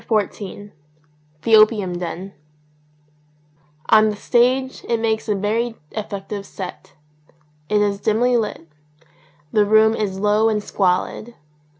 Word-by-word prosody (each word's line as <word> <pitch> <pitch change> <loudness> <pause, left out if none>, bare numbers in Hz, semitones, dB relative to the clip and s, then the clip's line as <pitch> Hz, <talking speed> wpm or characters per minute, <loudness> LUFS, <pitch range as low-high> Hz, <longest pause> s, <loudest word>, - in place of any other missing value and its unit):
59 215 -4 +1
XIV 205 0 -9 0.7
THE 225 - +5
OPIUM 210 -5 +3
DEN 180 +2 -6 1.6
ON 215 0 +6
the 210 - -3
stage 255 +4 +1
it 235 -1 +1
makes 220 -1 -1
a 210 - +2
very 225 +4 -1 0.2
effective 205 -1 -5
set. 185 -2 -9 0.8
It 210 0 +2
is 200 -1 0
dimly 240 +3 +2
lit. 210 -7 -2 0.8
The 210 - +4
room 220 +1 +4
is 200 -4 -2
low 210 +2 +3
and 210 -1 -1
squalid. 200 +5 -1
210 Hz, 120 wpm, -20 LUFS, 200-225 Hz, 1.6 s, ON